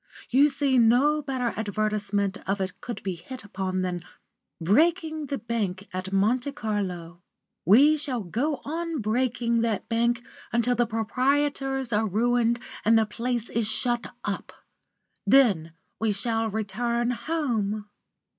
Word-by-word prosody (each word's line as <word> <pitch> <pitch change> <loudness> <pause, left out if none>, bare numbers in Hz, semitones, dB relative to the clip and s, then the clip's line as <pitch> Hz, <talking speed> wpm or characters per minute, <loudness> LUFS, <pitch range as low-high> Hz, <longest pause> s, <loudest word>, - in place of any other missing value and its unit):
You 280 +4 +6
see 275 -2 +2
no 260 +7 +4
better 260 -4 -2
advertisement 205 -1 -1
of 200 +1 +1
it 190 -1 -4
could 240 - -6
be 190 - -2
hit 225 +9 -9
upon 190 -2 -2
than 180 -1 -2 0.6
breaking 310 - +2
the 275 - -2
bank 205 -5 -3
at 185 +1 -4
Monte 240 +8 +1
Carlo. 185 -8 -4 0.4
We 285 +10 +6
shall 265 -7 -2
go 270 - -2
on 330 +2 -3
breaking 235 +1 +1
that 225 -3 -1
bank 235 +1 +1 0.3
until 235 +1 +2
the 240 0 +2
proprietors 270 +3 0
are 215 +1 +2
ruined 235 +3 +2 0.2
and 225 +1 +5
the 220 - +4
place 235 +2 -2
is 230 -2 -1
shut 240 +2 -1 0.2
up. - - -4 0.8
Then 195 -12 +4 0.3
we 220 -1 +1
shall 225 +1 -1
return 235 +3 -1
home." 235 -8 -1
230 Hz, 135 wpm, -26 LUFS, 205-260 Hz, 0.8 s, You